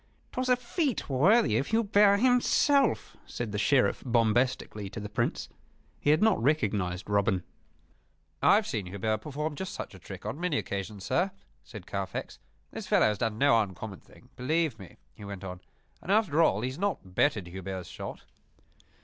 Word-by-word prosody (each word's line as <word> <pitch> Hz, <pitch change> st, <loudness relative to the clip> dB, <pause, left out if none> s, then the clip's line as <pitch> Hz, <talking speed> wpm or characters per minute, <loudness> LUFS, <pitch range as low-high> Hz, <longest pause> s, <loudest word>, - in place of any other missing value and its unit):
"'Twas 255 Hz, 0 st, -2 dB
a 250 Hz, -, +6 dB
feat 250 Hz, -, -2 dB
worthy 140 Hz, -, +4 dB
of 140 Hz, -, -2 dB
Hubert 205 Hz, -2 st, +4 dB
himself," 260 Hz, +3 st, +3 dB
said 120 Hz, -3 st, -5 dB
the 105 Hz, -, -2 dB
Sheriff, 115 Hz, -1 st, +2 dB
bombastically, 115 Hz, -3 st, +1 dB
to 110 Hz, -, -7 dB
the 105 Hz, 0 st, -6 dB
Prince. 105 Hz, -, -1 dB, 0.5 s
He -, -, 0 dB
had 155 Hz, +6 st, +4 dB
not 220 Hz, -, +3 dB
recognized 105 Hz, -, 0 dB
Robin. 100 Hz, -3 st, +1 dB, 1.0 s
"I -, -, +6 dB
have 215 Hz, 0 st, +2 dB
seen 105 Hz, -, -3 dB
Hubert 100 Hz, +3 st, -1 dB
perform 150 Hz, +4 st, -4 dB
just 190 Hz, +3 st, -5 dB
such -, -, -6 dB
a -, -, -12 dB
trick -, -, -10 dB
on 145 Hz, -, -4 dB
many 175 Hz, -5 st, 0 dB
occasions, 100 Hz, 0 st, -4 dB
sir," 185 Hz, +3 st, +1 dB, 0.3 s
said -, -, -10 dB
Carfax. -, -, -5 dB, 0.3 s
"This -, -, -7 dB
fellow -, -, +4 dB
has 105 Hz, -2 st, +1 dB
done 110 Hz, -2 st, -1 dB
no 115 Hz, -3 st, +5 dB
uncommon 100 Hz, 0 st, -6 dB
thing, -, -, -20 dB
believe 150 Hz, -1 st, 0 dB
me," 95 Hz, -, -12 dB, 0.2 s
he -, -, -13 dB
went 100 Hz, -1 st, -7 dB
on. 90 Hz, -1 st, -7 dB, 0.4 s
"And 190 Hz, -, -4 dB
after 195 Hz, -7 st, +3 dB
all, 105 Hz, -10 st, +3 dB
he 125 Hz, -, -1 dB
has 130 Hz, +5 st, -8 dB
not 185 Hz, -, -2 dB
bettered 105 Hz, -2 st, +2 dB
Hubert's 95 Hz, 0 st, -6 dB
shot." -, -, -8 dB
120 Hz, 175 wpm, -29 LUFS, -, 1.0 s, a